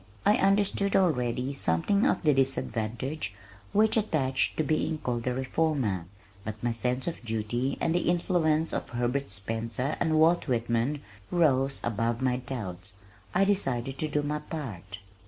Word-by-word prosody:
I 210 - +5
understood 200 0 +2
already 130 -6 +1
something 140 - +2
of - - +1
the 150 -2 +5
disadvantage 130 -2 -1 0.4
which 215 +1 +3
attached 150 - +1
to 155 - +2
being 155 0 0
called 120 -4 -3
a 125 - +1
reformer, 130 - 0 0.4
but 110 0 -4
my 120 - +1
sense 125 +4 -1
of 170 - -4
duty 120 +4 -1
and 165 - +1
the 175 -1 +1
influence 165 -3 +1
of - - -3
Herbert 125 +2 -1
Spencer 115 +7 -2
and 160 -2 +2
Walt 165 +2 +4
Whitman 120 +3 0 0.3
rose 135 -6 +2
above 115 +1 0
my 130 -1 +1
doubts. 100 -8 -6 0.4
I 195 - +5
decided 135 -10 -1
to 155 - 0
do 150 0 0
my 150 +1 -1
part. 105 - -7
135 Hz, 150 wpm, -28 LUFS, 115-160 Hz, 0.4 s, I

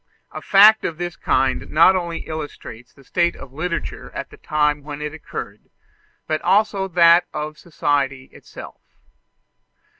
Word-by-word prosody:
A - - -8
fact 210 +2 +6
of 160 - -3
this 175 0 -5
kind 130 0 0
not 170 +5 +5
only 170 -2 -3
illustrates 145 -6 -8
the 140 - -20
state 170 +5 0
of 130 - -12
literature 170 +3 -4
at - - -6
the - - -14
time 150 -1 0
when 145 0 -8
it 150 0 -5
occurred, 160 - -9 0.6
but 155 0 -2
also 200 -1 +1
that 170 -1 +5
of 150 0 -5
society 140 -5 -1
itself. - - -12
155 Hz, 145 wpm, -21 LUFS, 145-175 Hz, 0.6 s, fact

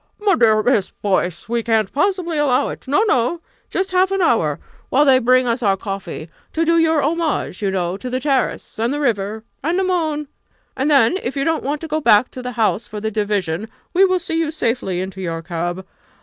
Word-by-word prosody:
"My 415 -2 +3
dear 220 -7 +4
Miss 225 -6 +2
Boyce! 185 -4 -2
we 235 +1 0
can't 220 -3 0
possibly 355 +1 0
allow 285 -2 +2
it - - -9
no! 295 +11 +3
no 260 - +1 0.3
just 380 0 -2
half 370 +1 +3
an 390 0 -1
hour 165 - +2 0.3
while 285 +3 +4
they 265 -2 +6
bring 255 +1 +3
us 240 +1 0
our 195 -4 +2
coffee 195 -5 -6 0.3
to 330 +1 +1
do 335 0 +3
your 320 -3 +3
homage, 315 - -1
you 200 - +1
know, 185 -1 -1
to 250 +5 -6
the 255 +1 -1
terrace 270 -5 -1
and 230 +3 +1
the 290 - -2
river 220 -5 -1 0.2
and 330 +5 0
the 380 - +2
moon! 315 -5 -1 0.5
And 270 +3 0
then 280 +3 +4
if 265 +3 -4
you 275 - +1
don't 325 +2 0
want 290 +2 -2
to 325 - -5
go 310 0 -1
back 230 -2 +4
to 255 - -7
the 250 0 -5
House 225 -1 0
for 210 - -6
the 220 +1 -3
division, 205 -2 -1 0.2
we 375 - +5
will 370 -1 +4
see 340 -2 -2
you 325 -2 0
safely 230 - -1
into 190 0 -6
your 165 -2 -4
cab. 175 +2 -4
250 Hz, 220 wpm, -20 LUFS, 205-315 Hz, 0.5 s, they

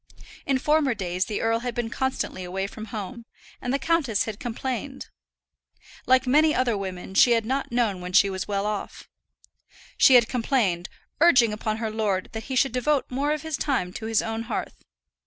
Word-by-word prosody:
In 275 -1 +2
former 290 -2 +2
days 185 -2 -2
the 210 - -3
earl 225 0 +1
had 240 -1 -4
been 235 -1 -2
constantly 265 -8 -2
away 190 +2 -3
from 215 +2 -8
home, 225 +3 -7 0.4
and 245 - -2
the 275 - +2
countess 280 -8 +1
had 220 -1 -6
complained. 260 +2 -5 1.0
Like 260 0 +4
many 305 +4 +4
other 245 -3 +1
women 190 -2 -6
she 235 +4 +6
had 230 -1 +1
not 265 +2 -2
known 225 -6 0
when 180 0 -6
she 195 +2 +5
was 190 -1 -4
well 200 -1 -1
off. 210 -1 -5 0.9
She 265 - +7
had 240 -2 +6
complained, 225 -8 0 0.3
urging 255 -9 +5
upon 215 0 -2
her 220 -1 -3
lord 205 -4 -1
that 220 0 -6
he 260 - -4
should 270 +1 +3
devote 255 +3 0
more 280 +4 0
of 300 -1 -2
his 315 -3 -3
time 210 -12 -1
to 220 - -6
his 225 -1 +1
own 225 0 -4
hearth. - - -4
230 Hz, 190 wpm, -25 LUFS, 205-265 Hz, 1.0 s, She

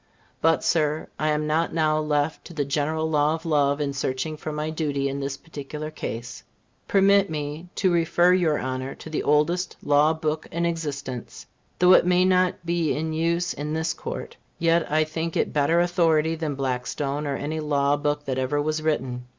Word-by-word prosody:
But, 165 -3 +3
Sir, 155 -2 +1
I 155 - +1
am 150 0 0
not 160 +2 0
now 155 -1 +2
left 150 0 0
to 170 - -11
the 145 -2 0
general 155 +2 -1
law 150 0 +2
of 165 +1 -10
love 145 -3 +2
in 145 -1 -1
searching 135 +3 -2
for 155 +1 -6
my 150 +1 -3
duty 145 -3 -1
in 140 +1 -3
this 140 0 -3
particular 150 0 -7
case. 120 -5 -6 0.5
Permit 200 0 +4
me 150 +2 -5
to 190 -2 +2
refer 175 +1 +3
your 170 -5 +2
Honor 130 +1 -4
to 160 - -10
the 155 - -1
oldest 170 +5 +1
law 145 +2 +4
book 155 -1 -2
in 170 +1 -1
existence. 145 -7 -4 0.3
Though 180 +1 +6
it 180 - +5
may 180 0 +4
not 185 -1 +2
be 170 -2 0
in 160 +1 -2
use 170 +2 0
in 150 +2 -4
this 160 +1 -1
Court, - - -7 0.2
yet 165 -1 +2
I 155 +1 +4
think 160 +1 -3
it - - 0
better 150 +3 +3
authority 165 -3 +2
than 160 -3 -3
Blackstone 135 +2 -2
or 140 - -1
any 155 +3 -3
law 145 -2 +1
book 145 0 -1
that 130 -1 -2
ever 130 +3 0
was 155 +1 -1
written. 130 -5 -2
155 Hz, 190 wpm, -25 LUFS, 145-165 Hz, 0.5 s, Though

